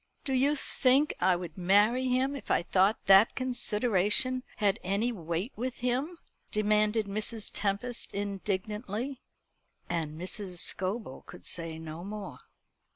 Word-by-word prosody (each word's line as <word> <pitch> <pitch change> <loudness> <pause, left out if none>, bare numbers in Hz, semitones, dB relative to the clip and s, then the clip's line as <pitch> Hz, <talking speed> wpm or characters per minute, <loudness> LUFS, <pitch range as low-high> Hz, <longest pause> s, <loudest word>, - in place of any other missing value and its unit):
"Do 270 - -2
you 275 +3 +3
think 275 +1 +2
I 185 0 +4
would 175 0 -7
marry 210 +8 +3
him 260 +2 +1
if 280 - -9
I - - +2
thought 190 +4 +2
that 195 +3 +6
consideration 245 -1 +2 0.2
had 205 +1 +1
any 200 +6 0
weight 175 - -3
with 250 +3 -4
him?" 260 +8 -1 0.3
demanded 215 +1 +2
Mrs. 215 +2 -2
Tempest 210 +4 -1
indignantly. 205 +5 -3 0.7
And 160 -2 -3
Mrs. 185 0 -4
Scobel 190 - -3
could - - -12
say 165 -2 -1
no 160 +1 -8
more. 205 +1 -7
210 Hz, 130 wpm, -30 LUFS, 185-245 Hz, 0.7 s, that